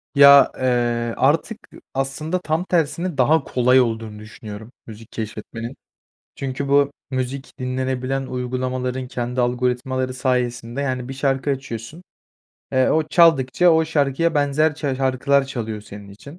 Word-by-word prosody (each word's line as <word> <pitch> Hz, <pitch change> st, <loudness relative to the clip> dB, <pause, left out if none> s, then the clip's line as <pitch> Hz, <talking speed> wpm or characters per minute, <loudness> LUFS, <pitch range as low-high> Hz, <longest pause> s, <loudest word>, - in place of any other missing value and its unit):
Ya, 140 Hz, 0 st, +8 dB
eee, 120 Hz, -2 st, 0 dB
artık, 165 Hz, +10 st, +1 dB, 0.2 s
ııı, -, -, -14 dB
aslında 135 Hz, +6 st, -2 dB
tam 160 Hz, 0 st, -1 dB
tersine 170 Hz, -1 st, -1 dB
daha 150 Hz, +5 st, +3 dB
kolay 125 Hz, +1 st, +3 dB
olduğunu 110 Hz, -3 st, -3 dB
düşünüyorum 110 Hz, +1 st, -10 dB, 0.2 s
müzik 110 Hz, 0 st, -12 dB
keşfetmenin. 115 Hz, +3 st, -6 dB, 0.6 s
Çünkü 135 Hz, +1 st, -4 dB
bu 140 Hz, 0 st, +3 dB, 0.2 s
müzik 130 Hz, +2 st, -4 dB
dinlenebilen 130 Hz, +1 st, -2 dB
uygulamaların 125 Hz, 0 st, -3 dB
kendi 125 Hz, 0 st, -2 dB
algoritmaları 125 Hz, +1 st, -1 dB
sayesinde, 125 Hz, -1 st, -1 dB
yani, 130 Hz, -2 st, -3 dB
bir -, -, -4 dB
şarkı 135 Hz, 0 st, -1 dB
açıyorsun, 135 Hz, +3 st, -5 dB, 0.7 s
eee, 130 Hz, -1 st, +3 dB
o 155 Hz, -1 st, +1 dB
çaldıkça 165 Hz, 0 st, +4 dB
o 160 Hz, 0 st, +4 dB
şarkıya 155 Hz, +1 st, 0 dB
benzer 145 Hz, +2 st, +2 dB
çar 145 Hz, -3 st, -2 dB
şarkılar 135 Hz, +1 st, +1 dB
çalıyor 110 Hz, -5 st, -5 dB
senin 100 Hz, -1 st, -11 dB
için. 140 Hz, -, -13 dB
130 Hz, 130 wpm, -21 LUFS, 125-140 Hz, 0.7 s, Ya